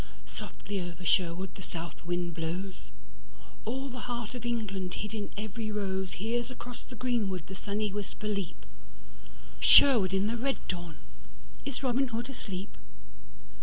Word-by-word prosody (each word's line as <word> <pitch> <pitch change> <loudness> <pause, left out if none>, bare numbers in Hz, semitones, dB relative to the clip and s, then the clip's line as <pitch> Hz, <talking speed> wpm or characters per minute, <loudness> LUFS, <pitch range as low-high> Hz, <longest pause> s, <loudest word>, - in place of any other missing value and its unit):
Softly 200 -2 -4
over 175 0 -5
Sherwood 180 +1 +3
the - - -9
south 170 -1 -6
wind 175 0 0
blows; 170 +4 -3 0.8
All 265 +4 -1
the 250 -1 -5
heart 235 -2 -2
of 240 -1 -3
England 195 -6 -1
hid 210 +1 -3
in 210 -2 -2
every 215 +1 -3
roseHears 205 +4 0
across 245 -1 -7
the 250 - -10
greenwood 210 -8 +1
the 190 - -7
sunny 205 +1 -1
whisper 205 +1 -4
leap, 200 -4 -2 0.9
Sherwood 230 -10 +9
in 195 +1 +3
the 230 +3 +1
red 270 +3 +1
dawn, 175 -4 -3 0.7
is 275 -1 -3
Robin 265 +1 +3
Hood 240 +2 -2
asleep? 195 -6 -5
205 Hz, 140 wpm, -32 LUFS, 185-235 Hz, 0.9 s, Sherwood